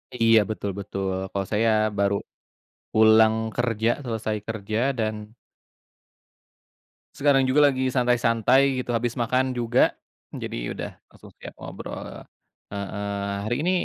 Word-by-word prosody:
Iya 115 Hz, -2 st, +5 dB
betul-betul. 100 Hz, -2 st, -3 dB, 0.2 s
Kalau 95 Hz, -1 st, -3 dB
saya 115 Hz, +2 st, +3 dB, 0.3 s
baru 100 Hz, 0 st, +2 dB, 0.8 s
pulang 110 Hz, 0 st, +6 dB, 0.2 s
kerja, 115 Hz, -2 st, 0 dB, 0.2 s
selesai 110 Hz, -3 st, -2 dB
kerja 110 Hz, -1 st, -3 dB, 0.2 s
dan 110 Hz, -1 st, -3 dB, 1.8 s
sekarang 135 Hz, -2 st, +3 dB
juga 145 Hz, +3 st, +5 dB
lagi 130 Hz, -1 st, -1 dB
santai-santai 125 Hz, +2 st, +3 dB
gitu, 125 Hz, -, -12 dB
habis 120 Hz, 0 st, -2 dB
makan 130 Hz, +2 st, 0 dB
juga, 120 Hz, 0 st, +2 dB, 0.4 s
jadi -, -, -5 dB, 0.2 s
udah -, -, -5 dB, 0.2 s
langsung -, -, -15 dB
siap -, -, -10 dB
ngobrol -, -, -8 dB, 0.5 s
heeh. 100 Hz, 0 st, -4 dB, 0.4 s
Hari 120 Hz, +2 st, 0 dB
ini 175 Hz, +4 st, +1 dB
115 Hz, 115 wpm, -24 LUFS, 110-125 Hz, 1.8 s, pulang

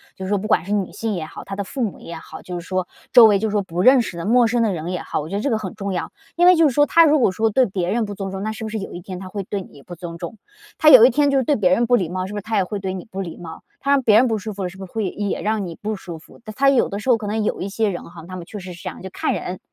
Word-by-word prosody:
就 190 Hz, -, -7 dB
是 -, -, -5 dB
说 205 Hz, -, +2 dB
不 210 Hz, -, -4 dB
管 -, -, +2 dB
是 200 Hz, +4 st, -3 dB
女 200 Hz, -3 st, -1 dB
性 225 Hz, -3 st, -3 dB
也 160 Hz, -, -4 dB
好， 155 Hz, -, -10 dB
他 195 Hz, -, -6 dB
的 200 Hz, -, -3 dB
父 255 Hz, +6 st, -6 dB
母 210 Hz, -, -3 dB
也 170 Hz, -, -8 dB
好， 160 Hz, -, -11 dB
就 180 Hz, -1 st, -5 dB
是 170 Hz, -, -11 dB
说 185 Hz, -1 st, -1 dB, 0.2 s
周 240 Hz, -, +9 dB
围， 205 Hz, -2 st, +5 dB
就 220 Hz, +1 st, -1 dB
是 -, -, -4 dB
说 205 Hz, -1 st, 0 dB
不 175 Hz, -1 st, -3 dB
认 260 Hz, +4 st, +7 dB
识 180 Hz, -, -6 dB
的 170 Hz, -, -5 dB
陌 240 Hz, +3 st, +4 dB
生 235 Hz, +1 st, +1 dB
的 220 Hz, -3 st, +2 dB
人 170 Hz, -1 st, -4 dB
也 180 Hz, -1 st, -3 dB
好， -, -, -3 dB
我 155 Hz, -, -7 dB
觉 195 Hz, -, -4 dB
得 205 Hz, -, -1 dB
这 280 Hz, -, 0 dB
个 225 Hz, -, +1 dB
很 210 Hz, -4 st, -6 dB
重 200 Hz, -3 st, -4 dB
要。 175 Hz, -, -3 dB, 0.2 s
因 350 Hz, -, +3 dB
为 360 Hz, 0 st, +8 dB
就 325 Hz, -1 st, +5 dB
是 -, -, -5 dB
说， 290 Hz, -, +5 dB
他 335 Hz, +3 st, +5 dB
如 305 Hz, -1 st, +4 dB
果 230 Hz, -, +3 dB
说 220 Hz, +4 st, +1 dB
对 255 Hz, +4 st, +3 dB
别 185 Hz, -4 st, -2 dB
人 230 Hz, 0 st, 0 dB
不 205 Hz, -, -6 dB
尊 195 Hz, -1 st, -5 dB
重， 195 Hz, +1 st, -5 dB
那 215 Hz, -, -2 dB
是 220 Hz, -, -7 dB
不 220 Hz, -, -4 dB
是 220 Hz, -, -4 dB
有 195 Hz, -, -6 dB
一 175 Hz, -, -7 dB
天 185 Hz, +1 st, -7 dB
他 185 Hz, 0 st, -8 dB
会 200 Hz, +2 st, -5 dB
对 195 Hz, +1 st, -4 dB
你 -, -, -16 dB
也 -, -, -14 dB
不 175 Hz, -, -9 dB
尊 170 Hz, -1 st, -8 dB
重， 220 Hz, -, -7 dB, 0.4 s
他 310 Hz, -, +6 dB
有 245 Hz, -3 st, +10 dB
一 -, -, +6 dB
天 285 Hz, +3 st, +2 dB
就 275 Hz, -, +2 dB
是 260 Hz, -, +2 dB
对 290 Hz, +3 st, +2 dB
别 190 Hz, -5 st, +2 dB
人 235 Hz, +5 st, +2 dB
不 245 Hz, -, +4 dB
礼 185 Hz, -8 st, 0 dB
貌， 185 Hz, +1 st, -3 dB
是 205 Hz, -, -8 dB
不 -, -, -4 dB
是 200 Hz, -, -10 dB
他 220 Hz, -1 st, -1 dB
也 195 Hz, -, +3 dB
会 205 Hz, +3 st, -4 dB
对 190 Hz, -1 st, -3 dB
你 185 Hz, -, -7 dB
不 195 Hz, -3 st, -6 dB
礼 170 Hz, -3 st, -7 dB
貌， 160 Hz, -2 st, -10 dB, 0.2 s
他 280 Hz, -, -1 dB
让 280 Hz, -1 st, +4 dB
别 215 Hz, -3 st, +5 dB
人 250 Hz, +3 st, +5 dB
不 220 Hz, -2 st, 0 dB
舒 215 Hz, +1 st, -6 dB
服 195 Hz, 0 st, -5 dB
了， 180 Hz, -, -2 dB
是 190 Hz, -, -14 dB
不 195 Hz, -, -7 dB
是 180 Hz, -, -17 dB
会 215 Hz, -5 st, -2 dB
也 205 Hz, +1 st, -3 dB
让 210 Hz, -2 st, -1 dB
你 170 Hz, -, -7 dB
不 215 Hz, +1 st, -2 dB
舒 175 Hz, -4 st, -8 dB
服， -, -, -18 dB
他 215 Hz, -, -7 dB
他 275 Hz, +6 st, +3 dB
有 270 Hz, -3 st, +3 dB
的 200 Hz, -, -4 dB
时 255 Hz, -, -4 dB
候 240 Hz, -, +5 dB
可 215 Hz, -, -7 dB
能 215 Hz, +1 st, -1 dB
有 -, -, -2 dB
一 195 Hz, -, -3 dB
些 215 Hz, +2 st, 0 dB
人 180 Hz, -, -5 dB
哈， 165 Hz, -2 st, -12 dB
他 185 Hz, -, -8 dB
们 175 Hz, -2 st, -7 dB
确 205 Hz, +3 st, -8 dB
实 180 Hz, -1 st, -8 dB
是 175 Hz, -, -13 dB
这 -, -, -3 dB
样， -, -, -11 dB
就 190 Hz, -, -7 dB
看 -, -, -2 dB
人。 180 Hz, 0 st, -5 dB
205 Hz, 415 characters per minute, -21 LUFS, 185-225 Hz, 0.4 s, 有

